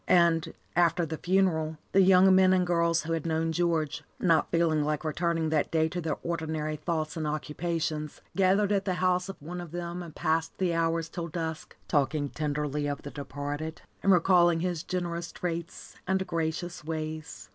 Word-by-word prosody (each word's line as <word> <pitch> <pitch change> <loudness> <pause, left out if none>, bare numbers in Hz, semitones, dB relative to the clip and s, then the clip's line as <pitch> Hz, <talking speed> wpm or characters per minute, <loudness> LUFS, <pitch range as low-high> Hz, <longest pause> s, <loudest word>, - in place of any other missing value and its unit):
And, 165 -2 +3 0.2
after 170 0 +3
the 160 0 -5
funeral, 170 -4 +1
the 195 - +5
young 190 0 +6
men 185 0 +6
and 180 -1 +3
girls 170 -1 +2
who 165 +1 -2
had 165 -2 -1
known 165 0 0
George, 160 -3 0 0.2
not 165 -3 +3
feeling 165 -3 +2
like 150 -1 -1
returning 165 0 0
that 155 -2 +1
day 160 -1 +2
to 175 +1 -3
their 160 - -2
ordinary 160 -2 -2
thoughts 155 0 -2
and 155 -2 -2
occupations, 155 0 -3 0.2
gathered 195 +2 +3
at 200 -1 +1
the 185 -2 0
house 180 +1 +1
of 195 - -7
one 175 +4 -6
of 175 - -8
them 175 +1 -5
and 165 -3 -9
passed 160 0 0
the 180 -3 +1
hours 165 0 +1
till 170 0 -5
dusk, 160 -1 -5
talking 145 -1 +1
tenderly 150 -1 -2
of 145 -1 -4
the 145 - -7
departed, 145 +2 -5 0.2
and 195 - +4
recalling 175 -2 +5
his 175 -3 -1
generous 170 -2 -3
traits 170 -1 -5
and 190 0 +1
gracious 165 0 -3
ways. 155 -1 -5
165 Hz, 180 wpm, -28 LUFS, 155-175 Hz, 0.2 s, young